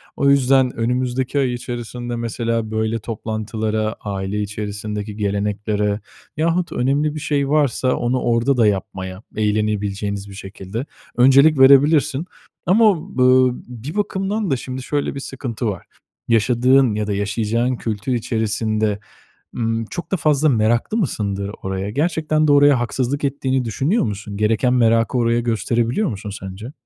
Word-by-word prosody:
O 140 - +2
yüzden 135 -2 +4
önümüzdeki 125 +3 -1
ay 130 -3 +1
içerisinde 120 0 -5
mesela 115 -1 -2
böyle 110 +1 -1
toplantılara, 110 0 -3
aile 100 0 -3
içerisindeki 105 0 -5
geleneklere 105 0 -1 0.4
yahut 170 +2 0
önemli 145 +4 0
bir 155 - -4
şey 145 -2 -1
varsa 140 -4 +2
onu 125 +1 0
orada 120 +3 +1
da 115 - +4
yapmaya 95 -1 -3
eğlenebileceğiniz 105 -1 -1
bir 100 - -10
şekilde 95 +5 -6 0.3
öncelik 135 +4 +6
verebilirsin. 140 +2 +5 0.4
Ama 200 -5 +2
b 125 - +2
ııı, 130 0 +5 0.2
bir 125 - -8
bakımdan 200 -1 -1
da 135 - +3
şimdi 130 +1 -6
şöyle 145 0 -2
bir 140 - -4
sıkıntı 125 -4 -4
var; 100 -4 -4 0.4
yaşadığın 125 +2 +3
ya 105 -1 -2
da 105 - -1
yaşayacağın 110 +5 0
kültür 110 +1 -4
içerisinde, 110 -2 -1 0.6
ımm, 115 -1 -1
çok 175 - -6
da - - +3
fazla 155 -1 +2
meraklı 120 - +1
mısındır 100 - -2
oraya? 95 +1 -3
Gerçekten 155 +3 0
de - - +5
oraya 145 -3 +5
haksızlık 130 +4 -2
ettiğini 135 -2 0
düşünüyor 135 - 0
musun? 105 -2 -5
Gereken 110 +4 +2
merakı 115 0 +3
oraya 115 0 +2
gösterebiliyor 120 - 0
musun 105 0 -6
sence? 95 +7 -8
120 Hz, 140 wpm, -20 LUFS, 105-135 Hz, 0.6 s, öncelik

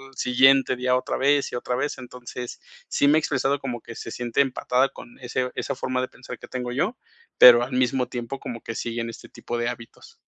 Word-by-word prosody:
siguiente 130 +2 +4
día, 125 0 +1
otra 125 - -1
vez 140 +1 +2
y - - -5
otra 125 0 -2
vez. 145 +4 -2
Entonces, 125 -1 -8 0.3
sí 140 - +2
me 150 - +5
ha - - +5
expresado, 140 -2 0
como 125 -4 -5
que 115 - -10
se 115 - -7
siente 120 +2 -3
empatada 130 -1 +1
con 120 - -13
ese 125 0 -2
esa - - -2
forma 130 0 -2
de 130 - -2
pensar 125 0 -10
que - - -11
tengo 125 -1 -4
yo, 145 - -1 0.4
pero 120 -1 +10
al 125 - -5
mismo 125 0 +1
tiempo, 125 +2 -5
como 115 -2 -7
que 115 - -6
sigue 115 +1 -3
en 115 - -4
este 115 - -10
tipo 120 - -5
de 120 0 -1
hábitos. 120 -1 -11
125 Hz, 220 wpm, -24 LUFS, 120-135 Hz, 0.4 s, pero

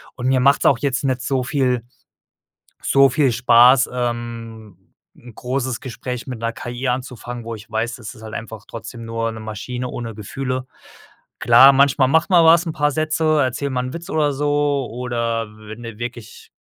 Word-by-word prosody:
Und 125 0 -3
mir 130 0 +3
macht's 140 +3 +3
auch - - +5
jetzt 140 -1 -1
nicht 130 -2 0
so 130 0 -1
viel 125 -3 0 1.0
so 135 -1 +4
viel 135 -3 +2
Spaß, 125 +2 +5
ähm, 115 -5 -6 0.2
'n 120 -2 -15
großes 130 -1 -3
Gespräch 125 -1 -6
mit 125 -3 -6
'ner 115 0 -2
KI 120 +2 -5
anzufangen, 125 -1 -4
wo 115 - -5
ich 110 0 -12
weiß, 115 +2 -2
das 120 -1 -9
ist 110 - -15
halt 110 - -9
einfach 115 -2 -8
trotzdem 115 +1 -9
nur 115 0 -2
'ne 110 - -8
Maschine 120 +4 -5
ohne 115 -2 -6
Gefühle. 130 +5 -4 0.7
Klar, 120 +4 +7
manchmal 135 -1 +4
macht 160 +6 +2
man 170 -2 +6
was 170 +2 +6
'n 165 - -2
paar 150 -1 +1
Sätze 155 0 +1
erzähl 135 +2 -2
mal 125 -1 -1
'n 130 - -5
Witz 170 +1 -7
oder 150 -2 +1
so 145 -2 0
oder 115 -2 -2
wenn 110 +2 -10
du 115 -2 -8
wirklich, 120 -2 -8
125 Hz, 180 wpm, -20 LUFS, 115-135 Hz, 1.0 s, Klar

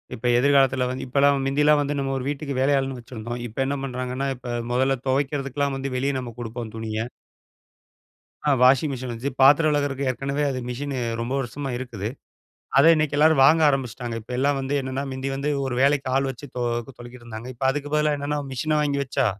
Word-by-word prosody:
இப்ப 120 +1 -1
எதிர்காலத்தில 135 -1 +3
வந்து 130 +1 -4
இப்பலாம் 140 +2 +3
முந்தில்லாம் 150 +2 +4
வந்து 145 0 -1
நம்ம 135 0 -1
ஒரு 130 - -4
வீட்டுக்கு 140 0 -3
வேலையாள்ன்னு 135 -1 +1
வச்சிருந்தோம். 120 0 -7
இப்ப 110 - -15
என்ன 140 +1 -1
பண்ணுறாங்கன்னா, 130 +1 -3
இப்ப 120 -1 -5 0.2
முதல்ல 130 +2 +2
துவைக்கிறதுக்குலாம் 140 +1 0
வந்து 135 +1 -3
வெளியே 140 +2 0
நம்ம 120 -2 -7
கொடுப்போம் 115 -1 -6
துணிய. 110 0 -3 1.4
ஆ - - +4
வாஷிங்மிஷின் 130 -1 +3
வந்துச்சு. 120 +4 -3
பாத்திரம் 145 +4 +6
விலக்குறதுக்கு 140 -2 0
ஏற்கனவே 140 +3 -2
அது 130 - -3
மிஷினு 135 +2 -4 0.2
ரொம்ப 120 +2 -3
வருஷமா 135 +2 -4
இருக்குது. 115 -5 -5 0.7
அத 140 - +7
இன்னக்கி 155 -2 0
எல்லாரும் 155 -1 +5
வாங்க 160 +3 +5
ஆரம்பிச்சுட்டாங்க. 125 -3 -2
இப்ப 110 - -12
எல்லாம் 140 +2 +2
வந்து 135 +1 -3
என்னென்னா, 130 +1 -3
மிந்தி 130 +1 -3
வந்து 140 +2 -2 0.2
ஒரு 130 -2 -2
வேலைக்கு 140 0 +3
ஆள்வச்சு 135 0 -3
தொ 125 - -2 0.4
தொலக்கிட்டு 120 0 -11
இருந்தாங்க. 115 +1 -7
இப்ப 130 - -3
அதுக்கு 145 +1 -5
பதிலா 150 -1 +2
என்னென்ன 145 +1 -2
மிஷின 150 +4 0
வாங்கி 140 -1 0
வச்சா, 130 - 0
135 Hz, 175 wpm, -24 LUFS, 125-140 Hz, 1.4 s, அத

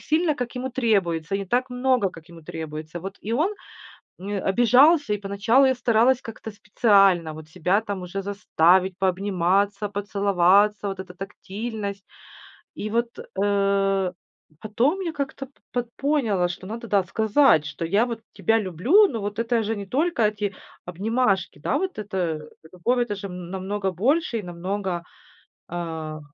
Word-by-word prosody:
сильно, 315 0 +1
как 245 -3 -5
ему 255 +1 -3
требуется, 195 -8 0
и - - +1
не 195 - -5
так 250 +5 0
много, 250 -5 +1
как 165 0 -14
ему 165 -2 -13
требуется. 155 +1 -7
Вот, 195 +3 -7
и 220 - -3
он, 320 - +1 0.7
э, 200 +1 -3
обижался, 245 - +4
и 210 - 0
поначалу 205 +7 +3
я 260 - +3
старалась 240 +1 +3
как-то 220 -1 -8
специально 195 -5 +3
вот 155 0 -10
себя 180 +5 +1
там 205 -3 -5
уже 180 +2 -4
заставить 190 -2 +2
пообниматься, 195 +2 +1
поцеловаться, 200 0 +2
вот 195 -1 -6
эта 185 -1 -8
тактильность. 200 +1 -6 0.7
И 215 - -5
вот, 235 +2 0 0.3
э, 195 -2 +1 0.5
потом 245 - +1
я 340 -4 -3
как-то 275 -2 -4 0.2
пот 245 -1 -2
поняла, 235 -11 +1
что 185 +2 -7
надо, 230 +3 -6
да, 200 -2 +2
сказать, 220 - +3
что 150 +2 -5
я 205 +8 +2
вот 235 -2 -5
тебя 225 0 +2
люблю, 220 - +4
но 230 - -4
вот 205 +2 -4
это 230 0 +1
же 220 +2 -1
не 200 - -5
только 280 - 0
эти 210 -1 -3 0.3
обнимашки, 195 - 0
да, - - 0
вот 380 0 -3
это, 205 -2 -5
э, 165 -4 -1 0.3
любовь- 240 +8 0
это 225 -4 -1
же 200 0 -7
намного 190 +2 -4
больше 245 - +1
и 210 - -7
намного, 180 +1 -3 0.7
а, 160 -3 -5
205 Hz, 155 wpm, -24 LUFS, 185-235 Hz, 0.7 s, обижался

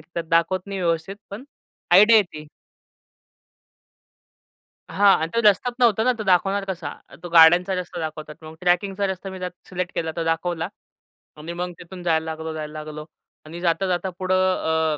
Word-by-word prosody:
की 155 - -22
त्यात 170 - -2
दाखवत 170 +3 +1
नाही 195 -1 -5
व्यवस्थित, 170 +3 -1
पण 215 +7 -8 0.5
आयडिया 210 +5 +8
येती. 170 -7 0 2.5
हां 200 0 +5
अन् 160 - -2
तो 230 - +1
रस्त्याच 210 +3 +3
नव्हता 225 -3 +3
ना, 255 - +3
तो 215 - -4
दाखवणार 195 +1 +2
कसा? 180 -6 -5 0.2
अ, - - -14
तो 175 - -6
गाड्यांचा 175 +3 +6
रस्ता 180 -1 -5
दाखवतात. 155 -1 -6
मग 155 0 -10
ट्रॅकिंगचा 190 +3 +1
रस्ता 190 0 -5
मी 190 0 -8
त्यात 180 0 -4 0.2
सिलेक्ट 180 -1 -4
केला 160 -1 -2
तो 165 - -2
दाखवला 165 +1 -1 0.7
आणि 160 +3 -7
मग 180 +1 -4
तिथून 180 +1 -10
जायला 160 -2 +1
लागलो, 160 0 -5
जायला 155 -1 -6
लागलो 150 0 -8 0.4
आणि 165 +3 -9
जाता-जाता 180 +1 0
पुढं 185 0 0 0.6
अ, - - -8
175 Hz, 170 wpm, -23 LUFS, 160-195 Hz, 2.5 s, आयडिया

